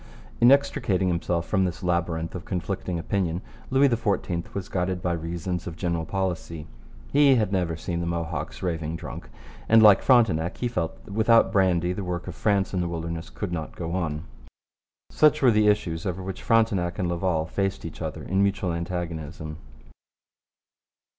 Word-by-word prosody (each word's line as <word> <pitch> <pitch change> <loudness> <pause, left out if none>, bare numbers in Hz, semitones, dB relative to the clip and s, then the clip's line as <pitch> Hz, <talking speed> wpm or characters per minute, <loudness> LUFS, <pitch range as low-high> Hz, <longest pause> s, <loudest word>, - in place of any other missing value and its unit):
In 120 +2 +7
extricating 120 -9 +2
himself 85 -1 -1
from 95 0 +1
this 90 0 -3
labyrinth 85 -2 -1
of 90 - -6
conflicting 90 -1 -3
opinion 90 +1 -1 0.3
Louis 135 +2 +5
XIV 105 -8 -1
was 100 -1 -3
guided 90 0 -1
by 90 0 -1
reasons 85 +1 -4
of 85 - -5
general 85 -2 -2
policy. 85 -4 -3 0.5
He 140 -2 +6
had 110 -5 +1
never 90 -4 0
seen 85 +1 -4
the 85 - -2
Mohawks 85 -1 -4
raving 80 -3 -2
drunk, - - -8 0.4
and, 115 0 +7
like 105 -2 +8
Frontenac, 100 - +3
he 125 - -1
felt 90 -9 -3
that 100 - -9
without 115 +2 +4
brandy 90 -4 +2
the 100 - -4
work 90 0 -4
of 90 - -5
France 100 +3 +1
in 90 - 0
the 85 - -1
wilderness 85 0 -4
could 100 -4 -5
not 80 -3 -4
go 85 -1 -4
on. 80 -4 -2 0.9
Such 150 -1 +4
were 125 - +7
the 105 -1 +3
issues 85 -5 +1
over 95 +1 -3
which 95 0 -6
Frontenac 100 -7 +2
and 90 - -1
Laval 85 -2 0
faced 95 +3 -2
each - - -8
other - - -4
in 95 +2 0
mutual 100 -3 +1
antagonism. 80 -3 -5
90 Hz, 170 wpm, -25 LUFS, 85-100 Hz, 0.9 s, like